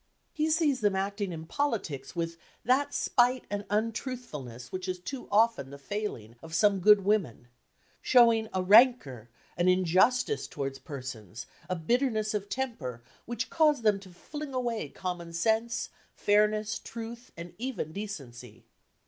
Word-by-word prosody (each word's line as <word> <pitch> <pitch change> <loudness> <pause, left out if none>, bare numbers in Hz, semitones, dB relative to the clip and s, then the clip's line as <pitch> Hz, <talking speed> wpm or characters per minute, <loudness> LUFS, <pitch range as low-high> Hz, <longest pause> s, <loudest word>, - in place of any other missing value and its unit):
He 310 +1 0
sees 310 -4 +2
them 205 -2 +2
acting 200 0 -2
in 160 -1 -6
politics 175 - -2
with 165 -1 -2 0.3
"that 270 +4 +3
spite 250 -1 +2
and 205 0 -3
untruthfulness 210 - -4
which 185 0 -4
is 185 0 -2
too 250 +9 -7
often 215 - +3
the 140 - -9
failing 140 - -5
of 165 0 -7
some 205 -1 +4
good 205 +1 +6
women," 170 - 0 0.5
showing 230 -3 +5
"a 185 -1 -1
rancour, 195 - +5 0.3
an 175 +1 +2
injustice 185 - +3
towards 135 -2 -5
persons, 125 - -8 0.2
a 185 - 0
bitterness 220 - 0
of 205 -1 -3
temper, 155 - -4 0.2
which 235 0 -3
cause 305 -6 +3
them 210 -2 +3
to 195 -1 -13
fling 285 - -8
away 235 - -2
common 175 -1 -5
sense, 225 +7 0 0.3
fairness, 210 +1 +2
truth 235 +1 -8
and 170 +1 -8
even 235 - -3
decency." 125 - -8
205 Hz, 140 wpm, -29 LUFS, 165-235 Hz, 0.5 s, good